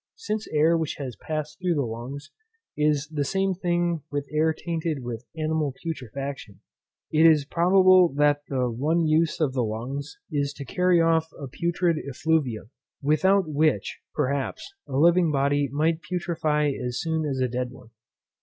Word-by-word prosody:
Since 215 +1 -4
air 155 +2 +3
which 160 -2 -2
has 130 -5 -6
passed 155 0 -5
through 180 -2 0
the 145 - +1
lungs 125 +6 -7 0.4
is 150 -1 +1
the 150 -2 -1
same 195 +6 0
thing 175 -2 0
with 145 -1 -3
air 155 +1 +2
tainted 160 -3 -3
with 120 0 -6
animal 155 -3 -1
putrefaction, 135 - -6 0.5
it 155 +1 +4
is 155 -3 +4
probable 185 +2 +5
that 145 0 +3
one 135 +6 0
use 155 +1 +2
of 150 -5 +1
the 130 - 0
lungs 130 +7 -5
is 145 -2 -1
to 140 - -8
carry 180 +6 +2
off 165 -1 +3
a 140 - -5
putrid 170 +3 0
effluvium, 135 -6 -1 0.3
without 175 +6 +3
which, 150 -7 0 0.2
perhaps, 140 - -2
a 130 - -3
living 170 +2 +4
body 140 0 +1
might 160 +3 +1
putrefy 160 -5 0
as 125 0 -3
soon 160 -1 -1
as 140 -3 -2
a 130 - +2
dead 125 +1 -3
one. 125 -2 -15
150 Hz, 155 wpm, -25 LUFS, 140-165 Hz, 0.5 s, probable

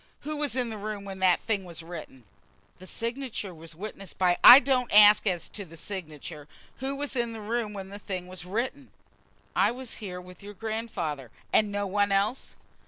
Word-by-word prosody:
Who 305 +2 -4
was 290 -3 -1
in 245 -3 0
the 215 - -6
room 205 -1 -5
when 195 -1 -7
that 185 -2 +4
thing 210 -4 -1
was 170 -2 -6
written?" 160 -7 -9 0.5
"The 185 - -13
signature 230 -3 -4
was 165 0 -10
witnessed 195 0 -8
by 180 -1 +2
" - - -33
"I 250 +2 +13
don't 255 -2 0
ask 210 +1 +8
as 180 -3 0
to 205 - -6
the 165 -2 -13
signature. 155 -5 -7 0.3
Who 270 +1 -3
was 285 0 -3
in 235 -2 0
the 225 - -7
room 220 0 -2
when 195 -1 -7
the 200 +1 -8
thing 185 -3 -5
was 185 -1 -6
written?" 240 +9 -3 0.7
"I - - +4
was 250 0 -5
here 185 -4 -6
with 180 0 -13
your 205 +1 -10
grandfather." 185 - -4 0.2
"And 210 -1 +4
no 205 0 -1
one 200 +1 +1
else?" 200 +6 0
205 Hz, 200 wpm, -28 LUFS, 180-230 Hz, 0.7 s, I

